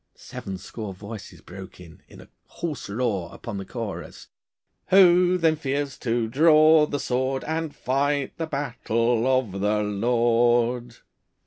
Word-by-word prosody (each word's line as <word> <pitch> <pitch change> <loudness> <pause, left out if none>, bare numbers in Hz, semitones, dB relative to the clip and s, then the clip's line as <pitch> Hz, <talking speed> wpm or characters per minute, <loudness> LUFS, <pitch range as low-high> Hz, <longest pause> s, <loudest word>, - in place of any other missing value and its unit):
Seven 95 -1 -8
score 100 +1 -8
voices 105 0 -10
broke 95 +1 -11
in, 85 -3 -14
in - - -14
a - - -16 0.2
hoarse 155 -10 -6
roar, 105 -5 -2
upon 105 -4 -7
the 95 - -6
chorus 115 -2 -7 0.6
'Who 180 -1 +5
then 165 -2 +2
fears 140 -2 -3
to 115 -1 -1
draw 155 +4 +5
the 145 - -3
sword, 130 0 -1
And 160 -1 -3
fight 140 +2 -1
the 165 - -3
battle 120 -4 -1
of 130 -7 0
the 105 +1 +1
Lord? 120 +2 +1
120 Hz, 135 wpm, -24 LUFS, 110-145 Hz, 0.6 s, Who